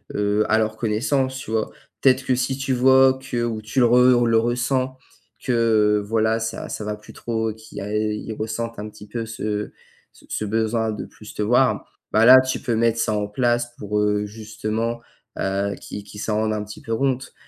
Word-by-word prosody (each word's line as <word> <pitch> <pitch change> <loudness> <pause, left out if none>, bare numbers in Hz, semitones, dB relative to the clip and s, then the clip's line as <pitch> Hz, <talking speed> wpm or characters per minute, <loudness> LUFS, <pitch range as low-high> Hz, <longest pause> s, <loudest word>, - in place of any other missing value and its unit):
heu, 105 +1 +1
à 110 - +4
leur 110 0 0
connaissance, 130 +4 0
tu 120 - -7
vois? 110 -1 0 0.3
Peut-être 130 0 +4
que 130 - +1
si 130 +1 -1
tu 135 0 -2
vois 130 +1 +5
que 130 -3 -3
ou 115 -2 -2
tu 110 +5 -2
le - - +6
re 125 0 +5
le 115 -1 +3
ressens 125 +3 0 0.5
que 110 -4 +3
voilà 110 +1 +1
ça 115 0 -4
ça 105 - -5
va 105 0 -2
plus 105 - -14
trop 110 -1 -2
qu'il 110 +1 -11
y - - -5
a 105 - -5
ils 105 +1 -2
ressentent 110 +1 -4
un 105 - -5
petit 105 0 -13
peu 115 +2 -4
ce 105 -2 -3 0.4
ce - - -20
ce 110 - -2
besoin 110 +1 0
de 105 - -5
plus 105 - -13
te - - -4
voir, 125 +5 +2 0.3
bah, 110 +1 +5
là 130 +2 +10
tu 130 0 -1
peux 120 - -1
mettre 115 0 +2
ça 110 - +1
en 105 -1 -1
place 120 +2 0
pour, 105 0 -2
heu, 105 0 +1
justement, 110 +2 -4 0.4
heu, 100 +1 -1
qu'ils 105 - -7
qu'ils 105 0 -9
s'en 110 - -1
rendent 110 0 +1
un 105 -1 -2
petit 105 0 -10
peu 115 - -2
compte 130 +1 -1
110 Hz, 210 wpm, -22 LUFS, 105-120 Hz, 0.5 s, là